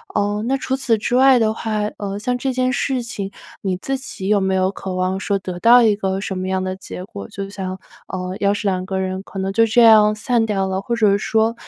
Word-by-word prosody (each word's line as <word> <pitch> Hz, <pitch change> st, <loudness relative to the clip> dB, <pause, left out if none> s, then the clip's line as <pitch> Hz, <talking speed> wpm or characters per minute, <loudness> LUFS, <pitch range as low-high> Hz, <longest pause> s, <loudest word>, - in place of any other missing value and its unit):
呃， 205 Hz, +1 st, 0 dB
那 270 Hz, +2 st, +1 dB
除 265 Hz, 0 st, -2 dB
此 255 Hz, -4 st, +1 dB
之 220 Hz, +3 st, -1 dB
外 265 Hz, 0 st, +6 dB
的 220 Hz, -2 st, +2 dB
话， 220 Hz, -1 st, -2 dB, 0.2 s
呃， 200 Hz, -1 st, -4 dB
像 250 Hz, +4 st, -1 dB
这 265 Hz, +1 st, -1 dB
件 255 Hz, 0 st, 0 dB
事 265 Hz, -2 st, -1 dB
情 200 Hz, -4 st, -5 dB, 0.3 s
你 190 Hz, -2 st, -1 dB
自 270 Hz, +7 st, -3 dB
己 190 Hz, -7 st, -7 dB
有 210 Hz, -1 st, +4 dB
没 190 Hz, 0 st, +1 dB
有 185 Hz, 0 st, +1 dB
渴 190 Hz, -1 st, -6 dB
望 185 Hz, +1 st, -1 dB
说 200 Hz, 0 st, 0 dB
得 180 Hz, -1 st, -5 dB
到 240 Hz, +4 st, +7 dB
一 215 Hz, -2 st, +4 dB
个 190 Hz, -1 st, -2 dB
什 190 Hz, -2 st, -4 dB
么 185 Hz, -, -3 dB
样 190 Hz, 0 st, -1 dB
的 185 Hz, 0 st, -2 dB
结 185 Hz, -, -8 dB
果？ 100 Hz, -, -9 dB
就 195 Hz, 0 st, -6 dB
像， 190 Hz, -2 st, -5 dB, 0.3 s
呃， 185 Hz, -1 st, -4 dB
要 200 Hz, 0 st, +2 dB
是 205 Hz, -, -4 dB
2 185 Hz, -1 st, -1 dB
个 190 Hz, 0 st, -3 dB
人 185 Hz, 0 st, -3 dB
可 195 Hz, -, -8 dB
能 190 Hz, 0 st, -1 dB
就 225 Hz, +3 st, +4 dB
这 230 Hz, +2 st, +3 dB
样 215 Hz, -2 st, +6 dB
散 230 Hz, +2 st, +1 dB
掉 195 Hz, -3 st, -1 dB
了？ 190 Hz, 0 st, -1 dB
或 235 Hz, +4 st, -2 dB
者 210 Hz, -4 st, +3 dB
说 220 Hz, +2 st, +1 dB
205 Hz, 260 characters per minute, -20 LUFS, 190-230 Hz, 0.3 s, 到